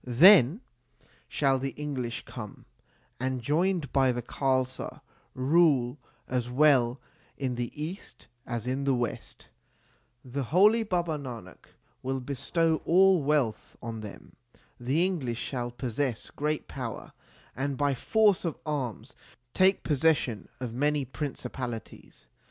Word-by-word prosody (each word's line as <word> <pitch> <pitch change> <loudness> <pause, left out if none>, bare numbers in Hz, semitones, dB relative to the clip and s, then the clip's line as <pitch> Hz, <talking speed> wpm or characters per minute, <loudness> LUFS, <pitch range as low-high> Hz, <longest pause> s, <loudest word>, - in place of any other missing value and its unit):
Then 155 - +7 0.7
shall 135 -2 +1
the 135 0 -3
English 130 -5 -4
come, - - -9 0.5
and, 130 0 -1
joined 160 +3 0
by 135 -2 +4
the 120 -1 -3
Khalsa, 130 0 -1 0.3
rule 140 -2 +3 0.3
as 125 -1 -1
well 130 -2 +4 0.4
in 130 -3 -2
the 120 -1 -3
East 160 -4 -7 0.2
as 120 -1 -3
in 130 +2 -1
the 135 -1 +3
West. 120 -2 -4 0.8
The 130 +1 -3
holy 205 - +5
Baba 175 -7 -1
Nanak 115 -9 -9 0.3
will 135 +1 -2
bestow 155 +5 0
all 185 0 +5
wealth 140 -6 0
on 115 -1 -6
them. 105 -2 -10 0.4
The 135 +8 +1
English 140 -11 -2
shall 120 -1 -3
possess 120 0 -3
great 150 +1 -2
power 125 -5 -6 0.4
and 135 +1 -2
by 145 -1 +2
force 205 - +3
of 165 -3 -2
arms 130 -5 -3 0.4
take 190 +1 +3
possession 145 -6 +1
of 125 -3 -5
many 145 +2 +1
principalities. 125 -3 -6
135 Hz, 125 wpm, -28 LUFS, 125-155 Hz, 0.8 s, Then